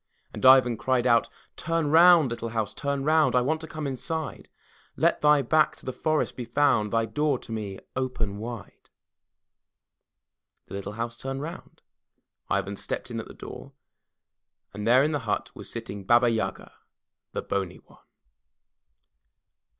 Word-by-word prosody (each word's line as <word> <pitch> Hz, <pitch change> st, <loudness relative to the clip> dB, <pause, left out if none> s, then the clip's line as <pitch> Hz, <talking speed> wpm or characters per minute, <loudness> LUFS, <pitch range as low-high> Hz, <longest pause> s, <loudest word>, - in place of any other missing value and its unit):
And -, -, -8 dB
Ivan 130 Hz, -3 st, +7 dB
cried 125 Hz, +3 st, 0 dB
out: 115 Hz, -1 st, +3 dB, 0.3 s
*Tum 165 Hz, -3 st, -1 dB
round, 165 Hz, -4 st, +7 dB
little 115 Hz, 0 st, -4 dB
house, 110 Hz, -2 st, -2 dB
turn 140 Hz, -1 st, -2 dB
round, 155 Hz, -4 st, +3 dB
I 125 Hz, -, +5 dB
want 155 Hz, +5 st, 0 dB
to 160 Hz, -, -7 dB
come 155 Hz, -1 st, -6 dB
inside; 155 Hz, +4 st, -4 dB, 0.5 s
Let -, -, +2 dB
thy 150 Hz, -1 st, +5 dB
back 155 Hz, +5 st, +3 dB
to -, -, -16 dB
the 130 Hz, -, -3 dB
forest 155 Hz, +3 st, 0 dB
be 125 Hz, -, -5 dB
found, 120 Hz, -4 st, +2 dB
Thy 115 Hz, 0 st, +2 dB
door 145 Hz, +5 st, 0 dB
to 115 Hz, -, -11 dB
me 105 Hz, -3 st, -4 dB, 0.2 s
open 120 Hz, -6 st, -2 dB
wide/' 115 Hz, -2 st, -8 dB, 1.8 s
The -, -, -13 dB
little 100 Hz, +1 st, -5 dB
house 115 Hz, +2 st, -4 dB
turned 135 Hz, +2 st, -5 dB
round, 165 Hz, +3 st, -9 dB, 0.7 s
Ivan 100 Hz, 0 st, -1 dB
stepped -, -, -5 dB
in -, -, -3 dB
at -, -, -7 dB
the -, -, -12 dB
door, -, -, -10 dB, 1.0 s
and 105 Hz, +2 st, -5 dB
there 125 Hz, +3 st, +6 dB
in 150 Hz, -, +1 dB
the 145 Hz, -, -1 dB
hut -, -, -1 dB
was -, -, -10 dB
sitting 115 Hz, -4 st, -6 dB
Baba 120 Hz, +4 st, +4 dB
Yaga, 110 Hz, -1 st, -3 dB, 0.6 s
the -, -, -3 dB
bony 95 Hz, -3 st, -3 dB
one. -, -, -21 dB
125 Hz, 160 wpm, -26 LUFS, 110-150 Hz, 1.8 s, Ivan